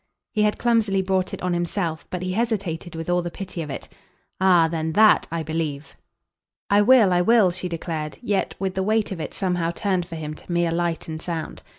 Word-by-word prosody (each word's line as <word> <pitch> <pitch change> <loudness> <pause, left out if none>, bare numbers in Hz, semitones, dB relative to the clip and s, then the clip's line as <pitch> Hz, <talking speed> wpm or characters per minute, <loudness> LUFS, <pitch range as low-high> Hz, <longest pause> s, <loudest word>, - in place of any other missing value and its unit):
He 215 - 0
had 210 0 +2
clumsily 220 -5 +2
brought 185 -1 0
it - - -7
on 180 -1 0
himself, 175 -2 -2
but 180 0 -4
he 185 - -2
hesitated 195 -7 -2
with 165 0 -5
all 175 0 +2
the 175 - -4
pity 185 0 -6
of 150 - -6
it. - - -6 0.5
"Ah 180 -3 +5
then 160 -1 -2
THAT 215 +3 +5
I 165 0 -3
believe." 155 -2 -4 0.8
"I 205 +1 +6
will, 220 -4 +6
I 175 - +3
will," 210 -1 +5
she 180 +1 -5
declared; 160 -2 -4
yet 205 -4 0
with 190 -1 -2
the 190 - -1
weight 215 +2 +1
of 185 - -4
it - - -6
somehow 180 -3 0
turned 180 0 -1
for 170 - -7
him 155 -1 -5
to 155 - -11
mere 170 -1 +1
light 170 -1 -1
and 160 0 -5
sound. 165 -3 -5
180 Hz, 215 wpm, -23 LUFS, 165-195 Hz, 0.8 s, I